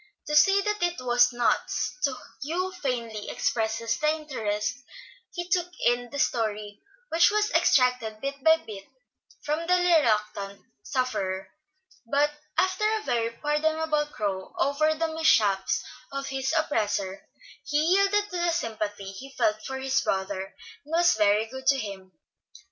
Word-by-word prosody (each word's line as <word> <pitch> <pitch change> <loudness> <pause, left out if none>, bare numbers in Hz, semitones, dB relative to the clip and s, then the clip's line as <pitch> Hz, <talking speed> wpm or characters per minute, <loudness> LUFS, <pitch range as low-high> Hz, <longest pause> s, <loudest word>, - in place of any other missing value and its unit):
To 300 - -2
say 390 +6 +6
that 420 0 -2
it 350 0 +1
was 245 0 +4
"nuts" 240 -1 0
to 275 -2 -1 0.3
Hugh 350 +6 -2
faintly 230 -6 -3
expresses 225 0 -1
the 305 - +2
interest 250 -7 -3 0.5
he 350 -1 -5
took 355 -1 +1 0.2
in 245 0 +2
the 285 - -6
story 210 -5 -1 0.3
which 335 +1 +5
was 420 0 +1
extracted 250 -4 +2
bit 275 +1 -5
by 320 0 +6
bit 195 -3 -8 0.6
from 310 +3 -2
the 360 - +5
reluctant 215 - +1 0.2
sufferer; 195 -8 -2 0.6
but 290 +1 +3 0.3
after 375 +3 +1
a 440 -1 -1
very 235 - 0
pardonable 300 +3 0
crow 195 -8 -4
over 310 +3 +2
the 320 0 -2
mishaps 210 -12 +2 0.3
of 275 0 -4
his 265 0 -1
oppressor, 205 -9 -1 0.3
he 295 - -1
yielded 395 +6 +3
to 360 - -3
the 345 0 +1
sympathy 210 - -3
he 270 +8 -11
felt 215 0 +1
for 265 0 -4
his 265 0 +1
brother, 190 0 -2 0.3
and 300 - -14
was 345 +1 +5
very 210 0 +3
good 265 +3 -9
to 275 - +5
him. 195 -5 -7
265 Hz, 145 wpm, -27 LUFS, 215-315 Hz, 0.6 s, say